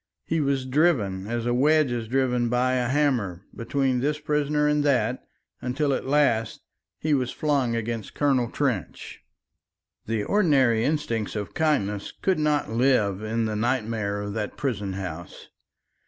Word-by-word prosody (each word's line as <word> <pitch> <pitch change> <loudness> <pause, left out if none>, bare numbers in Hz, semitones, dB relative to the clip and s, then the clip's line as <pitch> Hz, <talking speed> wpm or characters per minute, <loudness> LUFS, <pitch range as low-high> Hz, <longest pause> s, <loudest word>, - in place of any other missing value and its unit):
He 165 -1 0
was 135 -2 0
driven 125 - +1
as 120 0 -2
a 120 - +1
wedge 150 +2 +3
is 120 -2 -3
driven 125 -1 +1
by 125 +1 +1
a 125 -1 +1
hammer, 120 -11 0
between 130 +1 0
this 145 +3 0
prisoner 150 0 0
and 150 0 +2
that, 125 -4 +1 0.4
until 140 +3 0
at 130 - -3
last 130 -6 +1 0.4
he 155 -1 0
was 130 -3 +1
flung 140 -6 0
against 115 -1 -4
Colonel 135 -5 +2
Trench. 125 - -3 0.9
The 110 -2 -1
ordinary 135 - +3
instincts 120 -9 -1
of 105 -1 -4
kindness 105 - 0
could 190 -4 +1
not 150 -5 +1
live 115 -5 +2
in 110 +1 -1
the 110 -1 -2
nightmare 110 -3 -1
of 100 0 -5
that 105 -1 -4
prison 105 -8 -2
house. 90 -3 -7
125 Hz, 150 wpm, -25 LUFS, 110-145 Hz, 0.9 s, wedge